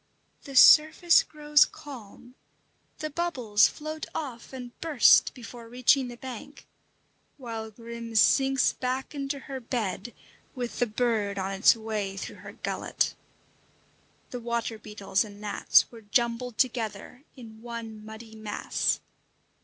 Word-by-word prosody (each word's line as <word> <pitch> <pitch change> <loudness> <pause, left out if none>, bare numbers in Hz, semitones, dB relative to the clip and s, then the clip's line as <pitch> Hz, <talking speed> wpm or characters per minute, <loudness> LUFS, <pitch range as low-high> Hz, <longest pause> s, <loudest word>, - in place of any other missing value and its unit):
The 275 -2 -9
surface 310 +5 +7
grows 295 -1 +3
calm, 245 -3 -10 0.6
the 310 0 -5
bubbles 260 -11 +2
float 310 +1 -6
off 255 -7 -6
and 250 -2 -8
burst 305 -8 +5
before 235 -1 -11
reaching 255 +2 +3
the 240 -1 -9
bank, 260 +3 -9 0.7
while 225 -4 -6
Grim 230 +1 -9
sinks 270 +4 +4
back 255 +2 -3
into 275 -1 -4
her 270 -1 -6
bed 235 -2 -4 0.4
with 245 -2 -5
the 245 - +2
bird 215 -3 -1
on 190 0 -2
its 195 +3 +5
way 215 -3 -4
through - - -7
her - - -11
gullet. - - -2 1.2
The 245 - -5
water 235 -1 -3
beetles 200 -2 -1
and 205 -2 -12
gnats 210 -1 +3
were 230 -2 -12
jumbled 235 +2 -1
together 245 +1 -2
in 225 -4 -12
one 230 -2 -7
muddy 220 +1 -11
mass. 215 -1 -2
235 Hz, 130 wpm, -27 LUFS, 220-265 Hz, 1.2 s, surface